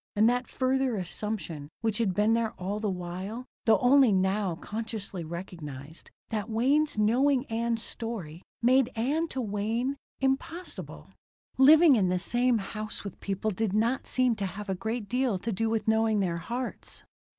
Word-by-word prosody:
And 215 Hz, +2 st, +5 dB
that 245 Hz, +1 st, +1 dB
further 260 Hz, -1 st, 0 dB
assumption, 180 Hz, -5 st, -4 dB
which 225 Hz, -2 st, 0 dB
had 200 Hz, -6 st, +1 dB
been 210 Hz, +3 st, +3 dB
there 230 Hz, -1 st, 0 dB
all 195 Hz, +3 st, -4 dB
the 210 Hz, -1 st, -1 dB
while, 185 Hz, +6 st, -5 dB, 0.2 s
though 220 Hz, -2 st, +6 dB
only 260 Hz, -1 st, +6 dB
now 190 Hz, -1 st, +1 dB
consciously 210 Hz, -2 st, -5 dB
recognized, 160 Hz, -3 st, -8 dB, 0.2 s
that 215 Hz, 0 st, -3 dB
Wayne's 275 Hz, +6 st, +2 dB
knowing 255 Hz, +5 st, +3 dB
Ann's 230 Hz, 0 st, -1 dB
story, 195 Hz, -9 st, -5 dB, 0.2 s
made 255 Hz, +1 st, +4 dB
Ann, 285 Hz, +9 st, 0 dB
to 265 Hz, -, -5 dB
Wayne, 225 Hz, +5 st, -1 dB, 0.2 s
impossible 270 Hz, +7 st, -3 dB, 0.5 s
Living 305 Hz, +2 st, +8 dB
in 190 Hz, -5 st, +2 dB
the 180 Hz, -, +1 dB
same 240 Hz, +6 st, +2 dB
house 215 Hz, +1 st, -5 dB
with 200 Hz, -3 st, -8 dB
people 200 Hz, +2 st, -2 dB
did 210 Hz, 0 st, -1 dB
not 230 Hz, +5 st, +1 dB
seem 255 Hz, -2 st, +2 dB
to 195 Hz, -, -1 dB
have 205 Hz, +2 st, -7 dB
a -, -, +1 dB
great 220 Hz, +3 st, -3 dB
deal 250 Hz, -2 st, +1 dB
to 225 Hz, +5 st, -3 dB
do 225 Hz, +3 st, 0 dB
with 220 Hz, -1 st, -1 dB
knowing 220 Hz, -1 st, +3 dB
their 175 Hz, -4 st, 0 dB
hearts. 240 Hz, +9 st, -5 dB
220 Hz, 160 wpm, -28 LUFS, 195-245 Hz, 0.5 s, Living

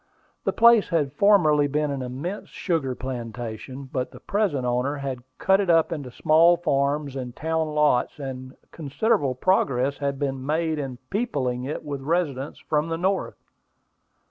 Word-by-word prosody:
The -, -, +2 dB
place 235 Hz, -2 st, +5 dB
had 150 Hz, -6 st, 0 dB
formerly 155 Hz, -5 st, +4 dB
been 150 Hz, +1 st, 0 dB
an 140 Hz, -1 st, -3 dB
immense 135 Hz, +11 st, -5 dB
sugar 155 Hz, -8 st, -2 dB
plantation; 120 Hz, +1 st, -6 dB
but 130 Hz, -1 st, -3 dB
the -, -, -13 dB
present 195 Hz, -11 st, 0 dB
owner 125 Hz, +4 st, 0 dB
had 135 Hz, -3 st, -4 dB, 0.2 s
cut 190 Hz, 0 st, +3 dB
it 195 Hz, -3 st, 0 dB
up 165 Hz, -1 st, +4 dB
into 145 Hz, -6 st, -4 dB
small 165 Hz, +7 st, +4 dB
farms 140 Hz, -3 st, 0 dB
and 125 Hz, -2 st, -5 dB
town 160 Hz, 0 st, -1 dB
lots, 150 Hz, -5 st, +2 dB
and 130 Hz, -2 st, -7 dB, 0.2 s
considerable 145 Hz, -, 0 dB
progress 140 Hz, -4 st, +1 dB
had 140 Hz, -1 st, -1 dB
been 135 Hz, -2 st, -2 dB
made 155 Hz, +2 st, 0 dB
in 135 Hz, -3 st, -4 dB
peopling 130 Hz, -, -1 dB
it 145 Hz, -, -4 dB
with 140 Hz, -2 st, -4 dB
residents 145 Hz, -3 st, -1 dB
from 150 Hz, +1 st, -1 dB
the 165 Hz, -, -1 dB
North. 190 Hz, +3 st, -1 dB
145 Hz, 155 wpm, -24 LUFS, 130-165 Hz, 0.2 s, place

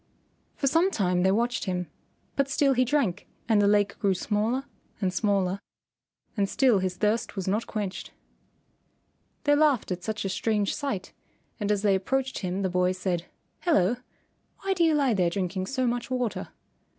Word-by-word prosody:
For -, -, -2 dB
some 330 Hz, +7 st, +4 dB
time 180 Hz, -, +1 dB
they 190 Hz, +1 st, +4 dB
watched 235 Hz, +4 st, 0 dB
him, 180 Hz, -2 st, -1 dB, 0.5 s
but 275 Hz, -1 st, +1 dB
still 275 Hz, -1 st, +3 dB
he 255 Hz, 0 st, +3 dB
drank 240 Hz, -8 st, 0 dB, 0.2 s
and 220 Hz, -3 st, +4 dB
the 200 Hz, -, +4 dB
lake 205 Hz, 0 st, +2 dB
grew 195 Hz, -2 st, +2 dB
smaller 220 Hz, +7 st, 0 dB, 0.4 s
and 190 Hz, -3 st, 0 dB
smaller 195 Hz, -2 st, +1 dB, 0.8 s
and 200 Hz, -3 st, +1 dB
still 250 Hz, -7 st, +4 dB
his 185 Hz, -1 st, -2 dB
thirst 210 Hz, +1 st, 0 dB
was 190 Hz, -2 st, -4 dB
not 210 Hz, +4 st, 0 dB
quenched. 205 Hz, -3 st, -4 dB, 1.3 s
They 290 Hz, -1 st, +4 dB
laughed 290 Hz, -9 st, +3 dB
at 180 Hz, 0 st, -3 dB
such 215 Hz, +1 st, -3 dB
a -, -, 0 dB
strange 210 Hz, +1 st, 0 dB
sight, 245 Hz, -11 st, -4 dB, 0.5 s
and 210 Hz, -1 st, 0 dB
as 205 Hz, -1 st, 0 dB
they 205 Hz, -2 st, +4 dB
approached 260 Hz, +7 st, -1 dB
him 185 Hz, +1 st, -2 dB
the -, -, +2 dB
boy 180 Hz, 0 st, +1 dB
said, 180 Hz, -2 st, -2 dB, 0.3 s
"Hello! 240 Hz, -, +2 dB, 0.6 s
Why 390 Hz, 0 st, +1 dB
do 350 Hz, -2 st, +1 dB
you 320 Hz, -2 st, +4 dB
lie 275 Hz, -5 st, +3 dB
there 180 Hz, -4 st, +2 dB
drinking 185 Hz, 0 st, -2 dB
so 260 Hz, +1 st, 0 dB
much 240 Hz, +1 st, -1 dB
water?" 250 Hz, -3 st, -2 dB
210 Hz, 175 wpm, -27 LUFS, 190-255 Hz, 1.3 s, some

